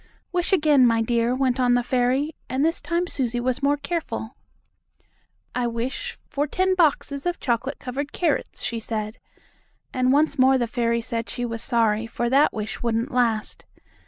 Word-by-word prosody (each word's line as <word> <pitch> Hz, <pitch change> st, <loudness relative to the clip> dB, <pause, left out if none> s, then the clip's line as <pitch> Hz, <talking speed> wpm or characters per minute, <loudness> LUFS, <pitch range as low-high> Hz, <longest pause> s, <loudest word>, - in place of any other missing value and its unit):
"Wish 355 Hz, +1 st, 0 dB
again, 300 Hz, -8 st, +5 dB
my 230 Hz, -1 st, +2 dB
dear," 235 Hz, +1 st, +1 dB
went 260 Hz, -1 st, +1 dB
on 245 Hz, -1 st, +4 dB
the 245 Hz, -, +2 dB
fairy, 255 Hz, +5 st, +1 dB, 0.2 s
and 265 Hz, +3 st, +1 dB
this 330 Hz, +1 st, 0 dB
time 340 Hz, +1 st, 0 dB
Susie 245 Hz, -7 st, -2 dB
was 250 Hz, +1 st, -1 dB
more 285 Hz, +1 st, +2 dB
careful. 285 Hz, -6 st, -4 dB, 1.2 s
"I 245 Hz, -1 st, 0 dB
wish 235 Hz, +3 st, -4 dB
for 290 Hz, 0 st, -1 dB
ten 375 Hz, +5 st, +1 dB
boxes 295 Hz, -3 st, +1 dB
of 350 Hz, -, -1 dB
chocolate 260 Hz, +2 st, -1 dB
covered 280 Hz, +2 st, -4 dB
carrots," 330 Hz, -5 st, -1 dB
she 230 Hz, -, -2 dB
said, 215 Hz, 0 st, -4 dB, 0.7 s
and 255 Hz, 0 st, +2 dB
once 295 Hz, +1 st, +2 dB
more 260 Hz, +1 st, +6 dB
the 245 Hz, -, +1 dB
fairy 235 Hz, 0 st, 0 dB
said 230 Hz, 0 st, -4 dB
she 245 Hz, -, -3 dB
was 230 Hz, -1 st, -4 dB
sorry, 225 Hz, -2 st, +1 dB
for 240 Hz, +1 st, -2 dB
that 280 Hz, +3 st, +5 dB
wish 215 Hz, -1 st, -5 dB
wouldn't 235 Hz, +3 st, -1 dB
last. 235 Hz, -4 st, 0 dB
250 Hz, 170 wpm, -24 LUFS, 235-285 Hz, 1.2 s, more